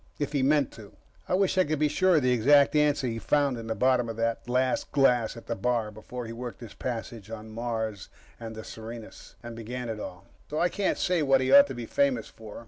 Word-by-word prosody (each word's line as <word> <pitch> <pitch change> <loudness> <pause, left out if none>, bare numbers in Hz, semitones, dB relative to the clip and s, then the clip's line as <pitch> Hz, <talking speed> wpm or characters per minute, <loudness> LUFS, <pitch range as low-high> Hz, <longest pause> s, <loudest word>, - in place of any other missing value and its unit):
If 145 -1 -2
he 140 - +1
meant 140 0 +2
to. 105 -3 -13 0.4
I - - +2
wish 190 0 +2
I - - +6
could 155 -1 -1
be 150 +1 +2
sure 185 +4 +3
of 150 - +3
the 125 - +3
exact 140 +5 +5
answer 150 -2 +3
he 115 -2 -2
found 140 +1 +1
in 115 - -8
the 110 - -2
bottom 125 -2 +2
of 115 - -4
that 115 +1 -2
last 130 +1 0
glass 125 -5 +2
at 115 - -11
the - - -2
bar 115 0 -1
before 120 +3 -8
he 115 - -7
worked 120 0 -7
his 115 -3 -9
passage 115 -3 -5
to 110 -1 -7
Mars 110 -2 -4 0.3
and 115 -1 -7
the 110 - -7
Serenus, 115 0 -10
and 120 -1 -7
began 120 +2 -5
it 110 -1 -4
all. 90 -3 -8 0.2
So, 150 - -2
I 175 - +3
can't 200 +2 -1
say 180 -2 +1
what 135 -2 +4
he 130 0 0
ought 140 +1 +9
to 135 - -6
be 120 -1 -5
famous 280 - +1
for. 110 -2 -11
125 Hz, 240 wpm, -27 LUFS, 115-145 Hz, 0.4 s, ought